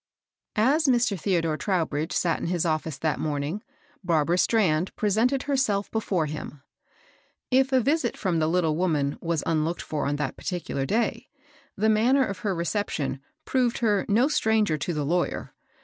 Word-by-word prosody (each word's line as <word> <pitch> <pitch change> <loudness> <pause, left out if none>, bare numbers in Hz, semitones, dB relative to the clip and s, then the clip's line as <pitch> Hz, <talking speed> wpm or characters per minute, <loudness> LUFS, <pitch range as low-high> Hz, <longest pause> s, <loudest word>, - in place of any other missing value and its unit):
S 280 +8 +3
Mr. 240 -5 +3
Theodore 165 -4 0
Trowbridge 165 -5 -1
sat 165 -3 +1
in - - -3
his 175 -1 0
office 155 -2 -1
that 155 -2 -1
morning, 150 +6 -2 0.4
Barbara 170 0 +2
Strand 185 -7 +2
pre 210 - 0
sented 250 +7 +2
herself 260 -8 0
before 195 -7 0
him. 150 -1 -7 0.9
If 265 +1 +3
a 260 - +4
visit 275 0 +1
•^TJj^ - - -16
from 180 -4 0
the 155 - +2
Kttle 165 -2 +2
woman 150 -4 0
was 165 -3 -1
nnlooked 165 +1 0
for 155 - -3
^j^ - - 0
on 145 - 0
that 145 -2 -3
particular 170 -7 -3
day, 230 +3 -1 0.5
the 215 +3 +1
manner 240 +5 +4
of 200 -4 -5
her 200 -3 -1
reception 170 -6 -2 0.3
proved 250 -3 +1
her 210 -5 +2
no 230 +6 +4
stranger 220 - +2
to 150 +4 -3
the 150 -3 -2
lawyer. 175 +4 -1
185 Hz, 170 wpm, -26 LUFS, 155-225 Hz, 0.9 s, a